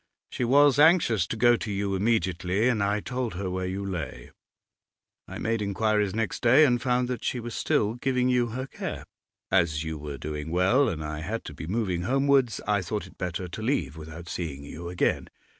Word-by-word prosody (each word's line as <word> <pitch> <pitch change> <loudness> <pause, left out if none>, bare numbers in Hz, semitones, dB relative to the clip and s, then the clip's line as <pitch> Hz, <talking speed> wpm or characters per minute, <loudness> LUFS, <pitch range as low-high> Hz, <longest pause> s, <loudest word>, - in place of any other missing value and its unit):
She - - -2
was 140 +2 +5
anxious 150 - +5
to 115 - -4
go 120 +1 +5
to 110 - -5
you 100 0 -1
immediately, 95 0 +1
and 115 -4 +1
I 100 +1 +1
told 125 -5 -3
her 95 0 -3
where 95 0 -2
you 95 +2 -3
lay. 80 -9 -5 1.0
I - - -7
made 115 0 -1
inquiries 105 0 0
next 115 -2 -2
day, 130 +6 +6
and 120 -3 +2
found 125 -1 +1
that 125 -1 -4
she 125 - -1
was 120 0 -6
still 105 +1 +1
giving 125 +1 0
you 125 -1 +2
her 130 +3 -4
care. 135 - -6 0.5
As 85 -5 +2
you 80 -1 -5
were 75 -1 -6
doing 75 +1 -5
well, 95 - +3
and 80 -5 -4
I 75 0 -4
had 105 +9 -4
to 75 - -7
be 80 - -8
moving 95 -3 -1
homewards, 135 0 +2
I 105 -2 +2
thought 100 +4 -3
it - - -17
better 90 0 -3
to 100 - -7
leave 120 - -1
without 80 +2 -9
seeing 75 -6 -5
you 85 +4 -7
again. 90 - 0
105 Hz, 200 wpm, -27 LUFS, 85-120 Hz, 1.0 s, day